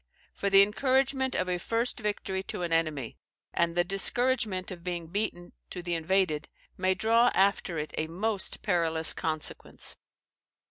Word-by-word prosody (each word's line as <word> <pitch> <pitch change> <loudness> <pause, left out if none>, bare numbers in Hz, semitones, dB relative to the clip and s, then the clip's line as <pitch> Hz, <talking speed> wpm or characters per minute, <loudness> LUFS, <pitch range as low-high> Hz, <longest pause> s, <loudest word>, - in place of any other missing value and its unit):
For 200 - -1
the 195 0 +8
encouragement 265 +4 +1
of 185 - 0
a 180 -1 -1
first 230 +6 0
victory 205 -3 -2
to 180 - -4
an 170 -1 -1
enemy, 155 -7 -1 0.3
and 170 0 +1
the 175 - +5
discouragement 195 0 +1
of 175 -2 -8
being 175 -2 -3
beaten, 175 -2 -2 0.2
to 180 - -7
the 175 0 -2
invaded, 165 -2 +1 0.3
may 185 0 +1
draw 230 +4 +4
after 190 -3 +2
it 150 0 -4
a 155 - -1
most 200 +4 -2
perilous 165 -4 +2
consequence. 155 -1 -3
185 Hz, 150 wpm, -29 LUFS, 170-210 Hz, 0.3 s, the